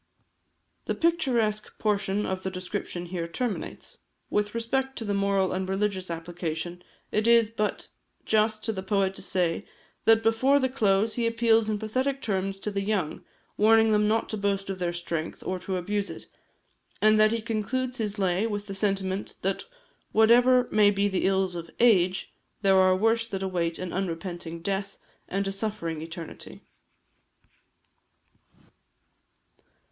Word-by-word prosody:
The -, -, -1 dB
picturesque 245 Hz, -11 st, 0 dB
portion 205 Hz, -1 st, 0 dB
of 190 Hz, 0 st, -2 dB
the 190 Hz, -, -2 dB
description 185 Hz, -1 st, -5 dB
here 170 Hz, -1 st, -4 dB
terminates. 220 Hz, +6 st, -4 dB, 0.3 s
With 210 Hz, +1 st, 0 dB
respect 265 Hz, +3 st, -1 dB
to 225 Hz, -, -4 dB
the 205 Hz, -, -1 dB
moral 200 Hz, -1 st, +1 dB
and 185 Hz, 0 st, -2 dB
religious 195 Hz, -1 st, -1 dB
application, 170 Hz, +1 st, -5 dB, 0.3 s
it 215 Hz, +1 st, +1 dB
is 230 Hz, -2 st, +5 dB
but 215 Hz, -2 st, -2 dB, 0.4 s
just 215 Hz, 0 st, +2 dB
to 225 Hz, -, -1 dB
the 190 Hz, -, -4 dB
poet 195 Hz, 0 st, +1 dB
to -, -, -7 dB
say, 180 Hz, -3 st, 0 dB, 0.4 s
that 225 Hz, 0 st, +5 dB
before 260 Hz, +5 st, +4 dB
the 260 Hz, -1 st, +1 dB
close 215 Hz, -3 st, +2 dB
he 235 Hz, -1 st, 0 dB
appeals 230 Hz, -1 st, +3 dB
in 215 Hz, -, 0 dB
pathetic 255 Hz, +6 st, -1 dB
terms 195 Hz, -4 st, -2 dB
to 210 Hz, -, -3 dB
the 200 Hz, 0 st, -1 dB
young, 195 Hz, -6 st, -1 dB, 0.3 s
warning 220 Hz, +1 st, +5 dB
them 210 Hz, 0 st, +3 dB
not 220 Hz, +1 st, +1 dB
to 215 Hz, -, -3 dB
boast 195 Hz, -1 st, -1 dB
of 190 Hz, -, -6 dB
their 175 Hz, -1 st, 0 dB
strength, 170 Hz, -2 st, -4 dB
or 185 Hz, 0 st, -2 dB
to 185 Hz, +1 st, -3 dB
abuse 200 Hz, +3 st, -2 dB
it; -, -, -8 dB, 0.7 s
and 215 Hz, 0 st, +5 dB
that 215 Hz, 0 st, +5 dB
he 230 Hz, -, 0 dB
concludes 240 Hz, +3 st, -2 dB
his 210 Hz, -1 st, -2 dB
lay 190 Hz, +2 st, +1 dB
with 205 Hz, -2 st, -3 dB
the 195 Hz, -, -6 dB
sentiment, 195 Hz, -1 st, -1 dB
that 195 Hz, +1 st, -1 dB, 0.5 s
whatever 245 Hz, +3 st, +5 dB
may 210 Hz, -1 st, +5 dB
be 200 Hz, 0 st, +1 dB
the 190 Hz, -2 st, 0 dB
ills 190 Hz, -1 st, +1 dB
of 170 Hz, -1 st, -6 dB
"age," 190 Hz, -6 st, +3 dB, 0.3 s
there 195 Hz, -1 st, +5 dB
are 185 Hz, 0 st, +5 dB
worse 225 Hz, +3 st, +2 dB
that 195 Hz, -3 st, -4 dB
await 170 Hz, -3 st, -1 dB
an 185 Hz, -1 st, -5 dB
unrepenting 170 Hz, -2 st, -4 dB
death, 195 Hz, +1 st, -2 dB, 0.3 s
and 195 Hz, +1 st, -1 dB
a -, -, -1 dB
suffering 195 Hz, -6 st, -3 dB
eternity. 165 Hz, 0 st, -9 dB
200 Hz, 155 wpm, -27 LUFS, 185-220 Hz, 0.7 s, is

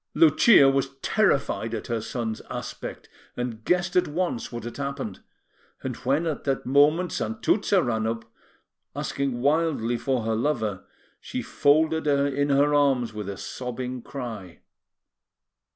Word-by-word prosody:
Lucia 235 Hz, -, +6 dB
was 135 Hz, 0 st, +1 dB
terrified 140 Hz, -, +1 dB
at 110 Hz, -, -5 dB
her 115 Hz, -2 st, -2 dB
son's 110 Hz, -1 st, -4 dB
aspect, -, -, -6 dB, 0.3 s
and 120 Hz, -2 st, -4 dB
guessed 180 Hz, +4 st, +1 dB
at 180 Hz, -, +3 dB
once 155 Hz, -5 st, -2 dB
what 120 Hz, -2 st, -6 dB
had 120 Hz, -, -7 dB
happened; 140 Hz, -8 st, -4 dB, 0.6 s
and 130 Hz, -2 st, -3 dB
when, 140 Hz, +6 st, 0 dB
at 155 Hz, -3 st, -3 dB
that 135 Hz, -2 st, -1 dB
moment, 150 Hz, +7 st, +4 dB
Santuzza 205 Hz, -4 st, +1 dB
ran 110 Hz, -2 st, 0 dB
up, 115 Hz, 0 st, -3 dB, 0.7 s
asking 135 Hz, -3 st, -2 dB
wildly 145 Hz, -5 st, +1 dB
for 130 Hz, -4 st, 0 dB
her 110 Hz, 0 st, 0 dB
lover, 110 Hz, -6 st, -1 dB, 0.4 s
she -, -, -5 dB
folded 155 Hz, +2 st, +2 dB
her 140 Hz, -1 st, +3 dB
in 145 Hz, +1 st, 0 dB
her 145 Hz, +1 st, +3 dB
arms 135 Hz, -6 st, +2 dB
with 105 Hz, -2 st, -5 dB
a 100 Hz, -, -5 dB
sobbing 125 Hz, +1 st, -5 dB
cry. 115 Hz, -10 st, -7 dB
135 Hz, 140 wpm, -25 LUFS, 115-150 Hz, 0.7 s, Lucia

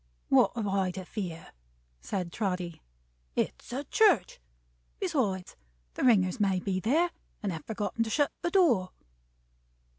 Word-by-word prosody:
"What -, -, +5 dB
have 225 Hz, -3 st, -2 dB
I 195 Hz, -1 st, +1 dB
to 185 Hz, 0 st, -6 dB
fear?" 175 Hz, -5 st, -6 dB, 0.5 s
said 180 Hz, -, -3 dB
Trotty. 180 Hz, -5 st, -2 dB, 0.5 s
"It's -, -, -2 dB
a 265 Hz, +4 st, -2 dB
church! 295 Hz, -, +3 dB, 0.6 s
Besides 195 Hz, -, -1 dB, 0.4 s
the -, -, -3 dB
ringers 210 Hz, -4 st, +4 dB
may 195 Hz, -3 st, +2 dB
be 185 Hz, 0 st, -1 dB
there, 315 Hz, -, +2 dB, 0.3 s
and 200 Hz, -, 0 dB
have 160 Hz, -3 st, -7 dB
forgotten 220 Hz, +1 st, -1 dB
to -, -, -4 dB
shut 290 Hz, +5 st, +2 dB
the 345 Hz, -, 0 dB
door." 275 Hz, -, +3 dB
200 Hz, 140 wpm, -29 LUFS, 185-250 Hz, 0.6 s, What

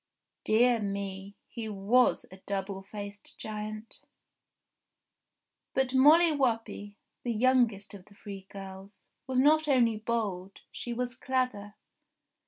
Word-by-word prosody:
Dear 235 Hz, +2 st, +4 dB
me! 200 Hz, -1 st, -4 dB
He 225 Hz, -2 st, -6 dB
was 210 Hz, +5 st, +2 dB
a 190 Hz, -, -11 dB
double 195 Hz, -1 st, -3 dB
faced 205 Hz, +1 st, -9 dB
giant! 215 Hz, +1 st, -6 dB, 1.7 s
But 265 Hz, -1 st, +1 dB
Molly 315 Hz, +6 st, +7 dB
Whuppie, 225 Hz, -7 st, -1 dB, 0.3 s
the 240 Hz, -, -2 dB
youngest 230 Hz, -4 st, +2 dB
of 190 Hz, -2 st, -11 dB
the 205 Hz, -, -20 dB
three 195 Hz, -2 st, -9 dB
girls, 195 Hz, +1 st, -10 dB, 0.2 s
was 260 Hz, -1 st, -1 dB
not 305 Hz, +4 st, +4 dB
only 240 Hz, -6 st, +3 dB
bold, 210 Hz, -4 st, -3 dB
she 240 Hz, -, -6 dB
was 245 Hz, +1 st, -2 dB
clever. 255 Hz, -6 st, -2 dB
215 Hz, 115 wpm, -30 LUFS, 200-250 Hz, 1.7 s, Molly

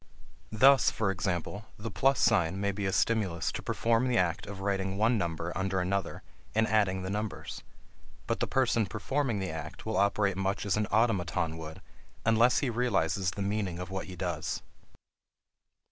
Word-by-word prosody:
Thus, 135 Hz, +4 st, +6 dB
for 105 Hz, -3 st, 0 dB
example, 95 Hz, +3 st, -3 dB
the 110 Hz, +2 st, -6 dB
plus 135 Hz, +6 st, +2 dB
sign 95 Hz, -4 st, +3 dB
may 100 Hz, 0 st, +1 dB
be 100 Hz, 0 st, -3 dB
a -, -, 0 dB
stimulus 95 Hz, -7 st, +1 dB
to -, -, -5 dB
perform 115 Hz, +2 st, +1 dB
the 125 Hz, -1 st, +2 dB
act 85 Hz, -3 st, 0 dB
of 100 Hz, -1 st, -7 dB
writing 95 Hz, -1 st, -1 dB
one 115 Hz, +3 st, +3 dB
number 85 Hz, -1 st, -3 dB
under 95 Hz, +1 st, 0 dB
another 95 Hz, +2 st, -2 dB, 0.3 s
and 110 Hz, -, +3 dB
adding 100 Hz, -3 st, +2 dB
the 95 Hz, -, -3 dB
numbers, 105 Hz, +1 st, -4 dB, 0.6 s
but -, -, -1 dB
the -, -, 0 dB
person 115 Hz, -5 st, +2 dB
performing 120 Hz, +4 st, -1 dB
the 95 Hz, -3 st, -3 dB
act 80 Hz, 0 st, -7 dB
will 110 Hz, -, -1 dB
operate 100 Hz, -1 st, +2 dB
much 95 Hz, +1 st, -1 dB
as 100 Hz, -, +1 dB
an 105 Hz, 0 st, 0 dB
automaton 90 Hz, -8 st, +1 dB
would 80 Hz, 0 st, -8 dB, 0.4 s
unless 115 Hz, +2 st, +4 dB
he 135 Hz, -, 0 dB
realizes 100 Hz, -6 st, +1 dB
the 100 Hz, +2 st, -4 dB
meaning 100 Hz, -3 st, -1 dB
of 90 Hz, +1 st, -6 dB
what 95 Hz, 0 st, -4 dB
he 95 Hz, -, -8 dB
does. 85 Hz, -3 st, -3 dB
100 Hz, 175 wpm, -30 LUFS, 90-110 Hz, 0.6 s, Thus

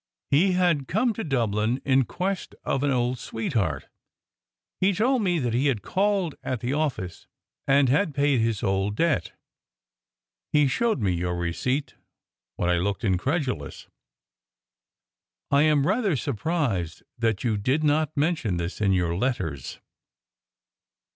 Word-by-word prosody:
He 180 Hz, +7 st, +4 dB
had 175 Hz, -7 st, +2 dB
come 220 Hz, +5 st, +1 dB
to 225 Hz, -, -4 dB
Dublin 115 Hz, -3 st, 0 dB
in 135 Hz, -1 st, +3 dB
quest 185 Hz, +5 st, -3 dB
of 135 Hz, -, -1 dB
an 145 Hz, -, +1 dB
old 125 Hz, -1 st, 0 dB
sweetheart. 105 Hz, -, -2 dB, 0.9 s
He 195 Hz, +2 st, +3 dB
told 245 Hz, +5 st, +2 dB
me 180 Hz, -4 st, +1 dB
that 125 Hz, -6 st, -1 dB
he 130 Hz, +5 st, +2 dB
had 115 Hz, -8 st, 0 dB
called 195 Hz, -4 st, 0 dB
at 125 Hz, -4 st, -3 dB
the 125 Hz, +3 st, -1 dB
office, 140 Hz, -, -3 dB, 0.4 s
and 140 Hz, 0 st, +4 dB
had 150 Hz, +4 st, +1 dB
paid 140 Hz, -3 st, +2 dB
his 115 Hz, -2 st, -1 dB
old 95 Hz, +1 st, 0 dB
debt. 165 Hz, +2 st, 0 dB, 1.2 s
He 150 Hz, -1 st, +4 dB
showed 220 Hz, -, 0 dB
me 95 Hz, -, +2 dB
your 90 Hz, +1 st, -2 dB
receipt 105 Hz, -, -2 dB, 0.6 s
when -, -, -1 dB
I 90 Hz, -1 st, +2 dB
looked 100 Hz, +5 st, -2 dB
incredulous. 110 Hz, -, -2 dB, 1.6 s
I 140 Hz, 0 st, +5 dB
am 150 Hz, -2 st, +3 dB
rather 200 Hz, -2 st, +1 dB
surprised 120 Hz, -, -2 dB, 0.2 s
that 110 Hz, -4 st, 0 dB
you 115 Hz, -4 st, +1 dB
did 130 Hz, +9 st, 0 dB
not 155 Hz, 0 st, +1 dB
mention 145 Hz, -, 0 dB
this 85 Hz, +4 st, -4 dB
in 100 Hz, -2 st, +3 dB
your 85 Hz, -2 st, +1 dB
letters." 90 Hz, -, -3 dB
130 Hz, 140 wpm, -25 LUFS, 100-155 Hz, 1.6 s, I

